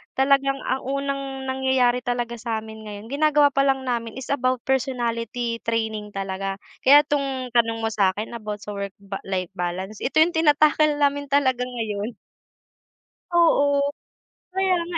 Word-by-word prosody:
talagang 275 Hz, 0 st, +3 dB
ang 265 Hz, -, -1 dB
unang 275 Hz, -1 st, -3 dB
nangyayari 260 Hz, -2 st, +2 dB
talaga 240 Hz, -1 st, -2 dB
samin 220 Hz, -1 st, -5 dB
ngayon 205 Hz, +1 st, -8 dB
ginagawa 295 Hz, 0 st, +4 dB
pa 275 Hz, -, +4 dB
lang 270 Hz, -1 st, +1 dB
namin 230 Hz, -2 st, -2 dB
is 255 Hz, -, -8 dB
about 255 Hz, -2 st, +1 dB
personality 235 Hz, -2 st, -1 dB
training 220 Hz, -2 st, -2 dB
talaga. 195 Hz, 0 st, -3 dB, 0.2 s
Kaya 290 Hz, +2 st, +7 dB
tong 270 Hz, -4 st, -2 dB
tanong 225 Hz, -1 st, +1 dB
mo 225 Hz, -, 0 dB
sa'kin 205 Hz, +2 st, 0 dB
about 210 Hz, -3 st, -6 dB
sa 210 Hz, -, -6 dB
work 200 Hz, -1 st, -5 dB
ba 200 Hz, 0 st, -7 dB
life 185 Hz, -2 st, -1 dB
balance 185 Hz, +4 st, -3 dB
ito 275 Hz, -, +1 dB
yung 340 Hz, 0 st, -2 dB
tinatackle 305 Hz, -1 st, +4 dB
namin 285 Hz, 0 st, +1 dB
talaga 260 Hz, -3 st, +2 dB
ngayon. 220 Hz, -2 st, -3 dB, 1.2 s
Oo, 285 Hz, -5 st, +4 dB, 0.8 s
kaya 380 Hz, -1 st, +2 dB
nga 340 Hz, 0 st, -3 dB
250 Hz, 145 wpm, -23 LUFS, 220-275 Hz, 1.2 s, Kaya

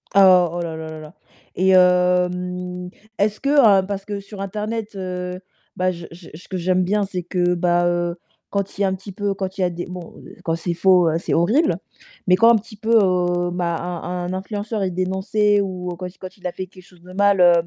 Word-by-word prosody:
Oh, 185 Hz, -3 st, +7 dB
oh 175 Hz, -, -3 dB
là 165 Hz, -1 st, -4 dB
là 160 Hz, 0 st, -6 dB
là 155 Hz, 0 st, -8 dB
là 155 Hz, +2 st, -11 dB, 0.4 s
et 190 Hz, +1 st, +2 dB
hem, 180 Hz, 0 st, +2 dB, 0.3 s
est-ce 210 Hz, +1 st, +1 dB
que, 275 Hz, -, -1 dB, 0.3 s
heu -, -, -7 dB
parce 200 Hz, -1 st, -4 dB
que 205 Hz, -1 st, -4 dB
sur 200 Hz, 0 st, -10 dB
internet, 210 Hz, +2 st, -4 dB
heu, 180 Hz, -1 st, -4 dB, 0.4 s
bah, 185 Hz, 0 st, +1 dB
je 170 Hz, -1 st, -8 dB
je 170 Hz, 0 st, -12 dB
ce 170 Hz, -, -13 dB
que 190 Hz, -, -4 dB
j'aime 185 Hz, +1 st, +1 dB
bien, 205 Hz, +3 st, +1 dB
c'est 185 Hz, -2 st, -4 dB
que, 180 Hz, 0 st, +1 dB
bah, 175 Hz, 0 st, +2 dB
heu, 175 Hz, 0 st, 0 dB, 0.3 s
quand 200 Hz, -1 st, -2 dB
il -, -, -3 dB
y -, -, +4 dB
a -, -, +3 dB
un 190 Hz, -, 0 dB
petit 195 Hz, +1 st, -10 dB
peu 200 Hz, 0 st, -2 dB
quand 190 Hz, -1 st, -4 dB
il -, -, -2 dB
y -, -, +3 dB
a 180 Hz, -, +2 dB
des 175 Hz, +1 st, -5 dB
bon 180 Hz, -2 st, -8 dB, 0.3 s
quand 165 Hz, -1 st, 0 dB
c'est 170 Hz, +1 st, -3 dB
faux, 180 Hz, -2 st, +4 dB
c'est -, -, -3 dB
horrible. 240 Hz, -, +3 dB, 0.5 s
Mais 180 Hz, -, +6 dB
quand 230 Hz, +2 st, +7 dB
un -, -, +6 dB
petit 215 Hz, +1 st, -10 dB
peu, 225 Hz, +1 st, -2 dB
heu, 175 Hz, -2 st, +1 dB
bah, 175 Hz, -1 st, -1 dB
un 175 Hz, -1 st, -5 dB, 0.2 s
un 185 Hz, -, -3 dB
influenceur 205 Hz, +2 st, -4 dB
est 185 Hz, -, 0 dB
dénoncé 190 Hz, +3 st, +1 dB
ou 185 Hz, -2 st, -4 dB
quand 180 Hz, -1 st, -5 dB
il 180 Hz, -, -14 dB
quand 185 Hz, +1 st, -9 dB
il 185 Hz, -, -17 dB
a -, -, -3 dB
fait 185 Hz, -, -6 dB
quelque 185 Hz, 0 st, -16 dB
chose 180 Hz, -1 st, -21 dB
de 185 Hz, +1 st, -12 dB
mal, 200 Hz, 0 st, +3 dB
heu, 175 Hz, -1 st, +7 dB
185 Hz, 235 wpm, -21 LUFS, 175-200 Hz, 0.5 s, Oh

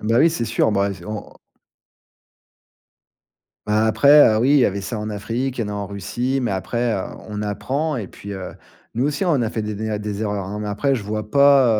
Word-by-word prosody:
Bah 115 Hz, +3 st, +2 dB
oui, 165 Hz, -, +6 dB
c'est 140 Hz, -8 st, -2 dB
sûr. 110 Hz, -1 st, +1 dB
Bah 100 Hz, 0 st, +1 dB
et -, -, -4 dB
c -, -, -13 dB
on 105 Hz, -1 st, -6 dB, 2.3 s
Bah, 105 Hz, +1 st, +2 dB
après, 140 Hz, +1 st, +6 dB
heu, -, -, +2 dB
oui, 130 Hz, -, +3 dB
il 145 Hz, -, +6 dB
y 130 Hz, -, +5 dB
avait 100 Hz, 0 st, -2 dB
ça 110 Hz, +2 st, -4 dB
en 105 Hz, -, -4 dB
Afrique, 115 Hz, +5 st, -3 dB
il 115 Hz, -, +1 dB
y -, -, -2 dB
en -, -, -5 dB
a -, -, -4 dB
en 100 Hz, -1 st, -3 dB
Russie, 120 Hz, +7 st, -2 dB
mais 120 Hz, -, 0 dB
après, 115 Hz, +5 st, -1 dB
heu, 95 Hz, -, -2 dB, 0.3 s
on 105 Hz, 0 st, -4 dB
apprend. 130 Hz, +9 st, -2 dB
Et 105 Hz, -6 st, -4 dB
puis, 100 Hz, 0 st, -9 dB
heu, 95 Hz, -1 st, -6 dB, 0.4 s
nous 125 Hz, +5 st, +1 dB
aussi, 145 Hz, +5 st, -1 dB
on 155 Hz, -8 st, +2 dB
a 115 Hz, -, 0 dB
fait 110 Hz, -1 st, -3 dB
des 105 Hz, 0 st, -3 dB
né 110 Hz, +2 st, -4 dB
à 105 Hz, -, -1 dB
des 105 Hz, 0 st, -4 dB
erreurs, 105 Hz, -2 st, -2 dB
hein, 100 Hz, +3 st, -5 dB
mais 105 Hz, -, -3 dB
après, 135 Hz, +7 st, +1 dB
je 120 Hz, -, -3 dB
vois 105 Hz, +1 st, -4 dB
pas, 140 Hz, -2 st, +6 dB
110 Hz, 245 wpm, -21 LUFS, 105-130 Hz, 2.3 s, oui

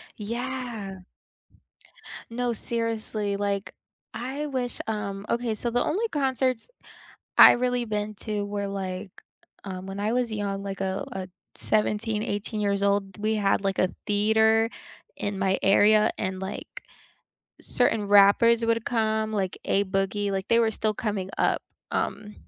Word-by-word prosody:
Yeah. 225 Hz, -3 st, -5 dB, 1.3 s
No, 245 Hz, 0 st, 0 dB
seriously, 220 Hz, -3 st, -2 dB
like 200 Hz, -1 st, -2 dB, 0.4 s
I 270 Hz, +5 st, -4 dB
wish, 255 Hz, -4 st, -2 dB
um 200 Hz, -2 st, -3 dB
okay, 235 Hz, -1 st, 0 dB
so 235 Hz, +3 st, -2 dB
the 245 Hz, +1 st, +1 dB
only 435 Hz, +8 st, 0 dB
concerts 260 Hz, -, 0 dB, 0.7 s
I -, -, +11 dB
really 245 Hz, 0 st, 0 dB
been 210 Hz, -1 st, -3 dB
to 210 Hz, -2 st, -1 dB
were, 200 Hz, 0 st, -3 dB
like, 190 Hz, 0 st, -4 dB, 0.5 s
um 190 Hz, -1 st, -6 dB
when 195 Hz, 0 st, -6 dB
I 215 Hz, -, 0 dB
was 245 Hz, -1 st, +1 dB
young, 200 Hz, -2 st, -3 dB
like, 195 Hz, -1 st, -5 dB
a 190 Hz, 0 st, -2 dB
a 185 Hz, -1 st, -5 dB, 0.3 s
17, 215 Hz, 0 st, 0 dB
18 210 Hz, +1 st, -3 dB
years 200 Hz, -1 st, 0 dB
old, 200 Hz, -1 st, +1 dB
we 215 Hz, +1 st, 0 dB
had, 195 Hz, -1 st, +1 dB
like, 195 Hz, -1 st, 0 dB
a 185 Hz, -, +1 dB
theater 220 Hz, +2 st, +3 dB, 0.5 s
in 205 Hz, -1 st, -3 dB
my 190 Hz, 0 st, +2 dB
area, 210 Hz, +2 st, +5 dB
and, 185 Hz, -1 st, -3 dB
like, 205 Hz, -, -7 dB, 0.8 s
certain 225 Hz, -4 st, +1 dB
rappers 205 Hz, +3 st, +6 dB
would 230 Hz, -1 st, +1 dB
come, 220 Hz, -2 st, 0 dB
like 190 Hz, -3 st, -1 dB
A-Boogie, 200 Hz, +1 st, 0 dB
like, 190 Hz, 0 st, -2 dB
they 230 Hz, 0 st, +4 dB
were 225 Hz, -1 st, +3 dB
still 215 Hz, 0 st, 0 dB
coming 200 Hz, -4 st, -3 dB
up, -, -, +2 dB, 0.3 s
um, 210 Hz, +1 st, -2 dB
210 Hz, 140 wpm, -26 LUFS, 200-230 Hz, 1.3 s, I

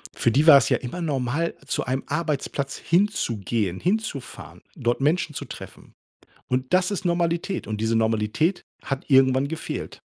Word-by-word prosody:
Für 120 Hz, -, +2 dB
die 145 Hz, +7 st, +3 dB
war's 140 Hz, -3 st, +8 dB
ja -, -, +3 dB
immer 130 Hz, +8 st, -6 dB
normal, 145 Hz, +1 st, -1 dB
zu -, -, -1 dB
einem 130 Hz, +1 st, -2 dB
Arbeitsplatz 145 Hz, -3 st, -2 dB
hinzugehen, 115 Hz, -, 0 dB
hinzufahren, 195 Hz, -, -3 dB
dort 120 Hz, 0 st, 0 dB
Menschen 150 Hz, +2 st, +1 dB
zu -, -, -5 dB
treffen. -, -, -11 dB, 0.6 s
Und 130 Hz, 0 st, -1 dB
das 185 Hz, +2 st, +3 dB
ist 200 Hz, -, -3 dB
Normalität. 170 Hz, +2 st, 0 dB
Und 110 Hz, 0 st, -4 dB
diese 115 Hz, 0 st, +1 dB
Normalität 110 Hz, -, +1 dB, 0.2 s
hat 135 Hz, 0 st, -4 dB
irgendwann 130 Hz, 0 st, +4 dB
gefehlt. 165 Hz, +1 st, -5 dB
140 Hz, 150 wpm, -24 LUFS, 120-170 Hz, 0.6 s, war's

